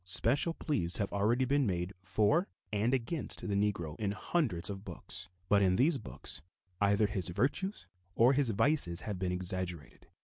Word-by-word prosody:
Special 125 Hz, -, +3 dB
pleas 90 Hz, -, 0 dB
have 100 Hz, -, -2 dB
already 110 Hz, +6 st, +2 dB
been 140 Hz, -1 st, +2 dB
made 90 Hz, 0 st, -2 dB
for 110 Hz, -, +2 dB, 0.3 s
and 105 Hz, +4 st, +1 dB
against 135 Hz, +1 st, 0 dB
the 100 Hz, -, -1 dB
Negro 100 Hz, -6 st, 0 dB
in 100 Hz, -2 st, -1 dB
hundreds 105 Hz, -, -1 dB
of 100 Hz, -2 st, -5 dB
books, 95 Hz, +1 st, -5 dB, 0.2 s
but 100 Hz, +1 st, +4 dB
in 95 Hz, -2 st, +3 dB
these 140 Hz, -, +3 dB
books 100 Hz, -, -5 dB, 0.4 s
either 100 Hz, +1 st, +4 dB
his 100 Hz, -5 st, -1 dB
virtues 145 Hz, -, -1 dB, 0.3 s
or 120 Hz, +4 st, +5 dB
his 140 Hz, -3 st, +2 dB
vices 100 Hz, -, +2 dB
have 105 Hz, -4 st, -4 dB
been 90 Hz, -1 st, -1 dB
exaggerated. 90 Hz, -, -4 dB
100 Hz, 165 wpm, -32 LUFS, 90-130 Hz, 0.4 s, or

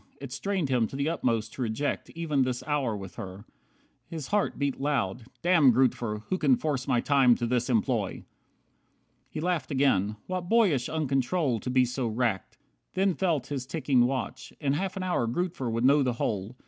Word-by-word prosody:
It 140 Hz, -2 st, -8 dB
strained 180 Hz, +2 st, -2 dB
him 120 Hz, -4 st, +2 dB
to -, -, -9 dB
the 140 Hz, +3 st, 0 dB
utmost 115 Hz, -9 st, -1 dB
to -, -, -7 dB
reject 125 Hz, +5 st, -2 dB
Even 155 Hz, -4 st, 0 dB
this 130 Hz, -1 st, -1 dB
hour 140 Hz, -7 st, 0 dB
with 95 Hz, -2 st, -9 dB
her. 95 Hz, +2 st, -8 dB, 0.6 s
His 160 Hz, -5 st, -6 dB
heart 205 Hz, -1 st, 0 dB
beat 140 Hz, -2 st, -1 dB
loud. 125 Hz, -6 st, -1 dB, 0.2 s
"Damn 170 Hz, -7 st, +6 dB
Grootver, 115 Hz, -3 st, +1 dB
who 185 Hz, -, 0 dB
can 260 Hz, -, +4 dB
force 145 Hz, -, -2 dB
my 125 Hz, -3 st, +2 dB
time 135 Hz, -4 st, +4 dB
to 120 Hz, -, -2 dB
this 120 Hz, +1 st, 0 dB
employ!" 115 Hz, -3 st, +1 dB
48 -, -, -10 dB, 1.0 s
He -, -, -5 dB
laughed 170 Hz, -6 st, -1 dB
again. 120 Hz, -7 st, +2 dB
What 180 Hz, -1 st, -4 dB
boyish 195 Hz, -, +3 dB
uncontrol 140 Hz, -2 st, 0 dB
To 125 Hz, -, -5 dB
be 130 Hz, 0 st, +4 dB
so 125 Hz, 0 st, -2 dB
racked. 115 Hz, -3 st, -1 dB, 0.4 s
Then 190 Hz, 0 st, +2 dB
felt 170 Hz, -7 st, 0 dB
his 130 Hz, -2 st, -4 dB
ticking 130 Hz, -4 st, +2 dB
watch. 130 Hz, -2 st, -4 dB
In 140 Hz, -3 st, 0 dB
half 190 Hz, +5 st, -2 dB
an 190 Hz, -, -3 dB
hour 175 Hz, -10 st, 0 dB
Grootver 145 Hz, -1 st, -2 dB
would 115 Hz, +2 st, 0 dB
know 140 Hz, +2 st, +5 dB
the 125 Hz, -2 st, +1 dB
whole. 110 Hz, 0 st, -3 dB
130 Hz, 185 wpm, -28 LUFS, 120-155 Hz, 1.0 s, Damn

